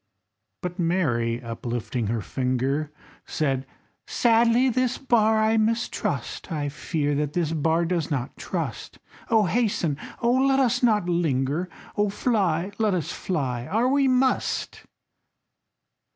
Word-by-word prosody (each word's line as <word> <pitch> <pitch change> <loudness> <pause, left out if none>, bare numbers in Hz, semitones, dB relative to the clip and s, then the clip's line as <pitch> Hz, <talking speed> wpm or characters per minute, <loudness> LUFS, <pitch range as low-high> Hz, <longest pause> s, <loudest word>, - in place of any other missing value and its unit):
But 180 +1 -4
Mary, 125 -10 +1
uplifting 115 0 -3
her 115 +1 -1
finger, 130 +6 -1 0.4
Said: 135 -3 -1 0.4
"Sadly 235 +2 +3
this 255 0 +1
bar 220 -4 +3
I 220 +1 +3
mistrust, 225 -3 -1
I 145 -3 -2
fear 150 0 -2
that 145 0 -1
this 170 -3 0
bar 165 +2 +1
does 170 -3 -1
not 140 -2 -3
trust. - - -5 0.3
Oh, 220 -2 +4
hasten! 190 - 0 0.2
oh, 235 0 +2
let 270 +1 +3
us 255 -4 +2
not 215 -7 +3
linger! 160 -1 0 0.3
Oh, 205 -1 +2
fly, 195 -5 0
let 215 -3 +2
us 170 - -2
fly, 130 -9 -3
are 230 +5 +1
we 275 0 +3
must!" 260 0 0
175 Hz, 125 wpm, -25 LUFS, 145-225 Hz, 0.4 s, Oh